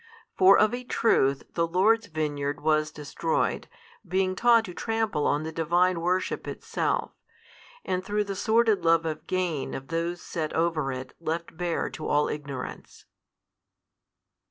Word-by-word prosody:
For 190 Hz, +1 st, +7 dB
of 215 Hz, +2 st, +3 dB
a 250 Hz, +1 st, -4 dB
truth 140 Hz, -, +2 dB
the 170 Hz, -1 st, +1 dB
Lord's 210 Hz, +6 st, +3 dB
vineyard 145 Hz, -2 st, -2 dB
was 155 Hz, 0 st, +2 dB
destroyed, 155 Hz, +2 st, -2 dB, 0.4 s
being 185 Hz, 0 st, 0 dB
taught 230 Hz, +1 st, +4 dB
to 180 Hz, -, -8 dB
trample 225 Hz, -7 st, -1 dB
on 145 Hz, +1 st, +1 dB
the 160 Hz, -, -4 dB
Divine 170 Hz, +2 st, +1 dB
worship 180 Hz, +2 st, -1 dB
itself, -, -, -2 dB, 0.7 s
and 185 Hz, 0 st, -1 dB
through 210 Hz, +2 st, 0 dB
the 200 Hz, -1 st, -5 dB
sordid 220 Hz, +1 st, +2 dB
love 165 Hz, 0 st, +4 dB
of 155 Hz, -2 st, -4 dB
gain 180 Hz, -6 st, -1 dB
of 135 Hz, 0 st, -8 dB
those 170 Hz, +1 st, -2 dB
set 160 Hz, -4 st, -4 dB
over 160 Hz, -4 st, 0 dB
it 130 Hz, 0 st, -6 dB
left 165 Hz, 0 st, -4 dB
bare 175 Hz, 0 st, -1 dB
to 155 Hz, -, -6 dB
all 150 Hz, 0 st, +2 dB
ignorance. 140 Hz, -3 st, -7 dB
170 Hz, 145 wpm, -27 LUFS, 155-190 Hz, 0.7 s, For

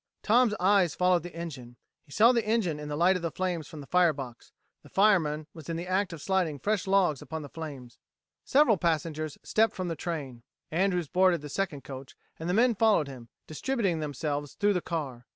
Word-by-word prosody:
Tom's 230 Hz, 0 st, +4 dB
eyes 190 Hz, -2 st, +3 dB
followed 180 Hz, -1 st, +3 dB
the 175 Hz, 0 st, -9 dB
engine. 135 Hz, -8 st, -7 dB, 0.2 s
He 145 Hz, -, -23 dB
saw 225 Hz, -, +6 dB
the 235 Hz, -2 st, +1 dB
engineer 210 Hz, -9 st, 0 dB
in 150 Hz, -, -6 dB
the 145 Hz, -, -3 dB
light 175 Hz, +5 st, +4 dB
of 180 Hz, -, -2 dB
the 165 Hz, -, -1 dB
flames 175 Hz, -3 st, -3 dB
from 150 Hz, 0 st, -9 dB
the -, -, -10 dB
firebox; 145 Hz, -8 st, 0 dB, 0.3 s
the -, -, -17 dB
fireman 165 Hz, -7 st, +2 dB
was 160 Hz, -2 st, -11 dB
in 165 Hz, -, -2 dB
the 170 Hz, -, -4 dB
act 185 Hz, +1 st, 0 dB
of 165 Hz, -3 st, -8 dB
sliding 185 Hz, -6 st, 0 dB
fresh 205 Hz, +5 st, -1 dB
logs 190 Hz, -7 st, +2 dB
upon 160 Hz, -1 st, -6 dB
the 145 Hz, -, -9 dB
flames. 140 Hz, -7 st, -8 dB, 0.4 s
Several 270 Hz, -6 st, +4 dB
passengers 155 Hz, -2 st, -1 dB
stepped 220 Hz, 0 st, +2 dB
from 185 Hz, -2 st, -3 dB
the 165 Hz, -, -2 dB
train. 145 Hz, -8 st, -5 dB, 0.3 s
Andrews 180 Hz, 0 st, +1 dB
boarded 180 Hz, -1 st, +3 dB
the 150 Hz, -, -8 dB
second 150 Hz, -5 st, -3 dB
coach, 130 Hz, 0 st, -9 dB, 0.2 s
and 165 Hz, +2 st, -4 dB
the -, -, +1 dB
men 240 Hz, +2 st, +4 dB
followed 210 Hz, -8 st, +3 dB
him, 125 Hz, -4 st, -10 dB, 0.2 s
distributing 195 Hz, -, -1 dB
themselves 145 Hz, -1 st, -3 dB
through 205 Hz, 0 st, +2 dB
the 180 Hz, -, 0 dB
car. 135 Hz, -9 st, -5 dB
170 Hz, 205 wpm, -28 LUFS, 150-195 Hz, 0.4 s, saw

